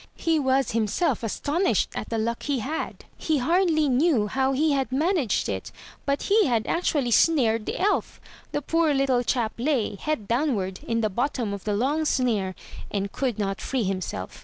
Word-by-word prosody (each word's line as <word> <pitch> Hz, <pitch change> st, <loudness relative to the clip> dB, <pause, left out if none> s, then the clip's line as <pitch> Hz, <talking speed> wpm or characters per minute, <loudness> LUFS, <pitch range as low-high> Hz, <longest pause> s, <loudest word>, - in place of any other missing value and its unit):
He 325 Hz, -1 st, +1 dB
was 265 Hz, -2 st, +1 dB
him 220 Hz, -1 st, +1 dB
self 295 Hz, -, 0 dB
astonished 295 Hz, -, 0 dB
at -, -, -5 dB
the 230 Hz, -, -1 dB
luck 230 Hz, +2 st, -1 dB
he 285 Hz, -2 st, -1 dB
had. 275 Hz, +7 st, -4 dB
He 315 Hz, -2 st, 0 dB
hardly 320 Hz, +2 st, +2 dB
knew 265 Hz, -3 st, +3 dB
how 265 Hz, +5 st, 0 dB
he 300 Hz, +3 st, +2 dB
had 270 Hz, -2 st, 0 dB
managed 295 Hz, -, +1 dB
it 95 Hz, -2 st, -4 dB, 0.2 s
— -, -, -21 dB
but 280 Hz, 0 st, 0 dB
he 415 Hz, -1 st, +3 dB
had 230 Hz, -4 st, +1 dB
actually 290 Hz, -7 st, 0 dB
snared 230 Hz, -7 st, +3 dB
the -, -, -3 dB
elf. 410 Hz, +3 st, 0 dB, 0.3 s
The 290 Hz, -, -2 dB
poor 325 Hz, -1 st, +2 dB
little 270 Hz, -2 st, +2 dB
chap 235 Hz, -2 st, 0 dB
lay, 250 Hz, -5 st, 0 dB
head 215 Hz, 0 st, -3 dB
downward, 230 Hz, -7 st, 0 dB
in 230 Hz, 0 st, 0 dB
the 215 Hz, -, +1 dB
bottom 240 Hz, -1 st, -1 dB
of 200 Hz, -, -7 dB
the 210 Hz, -1 st, 0 dB
long 285 Hz, +8 st, 0 dB
snare, 220 Hz, -10 st, 0 dB, 0.3 s
and 200 Hz, -1 st, -2 dB
could 255 Hz, -6 st, -2 dB
not 195 Hz, 0 st, -2 dB
free 260 Hz, -3 st, -1 dB
himself. 185 Hz, -, -4 dB
260 Hz, 185 wpm, -25 LUFS, 220-300 Hz, 0.3 s, knew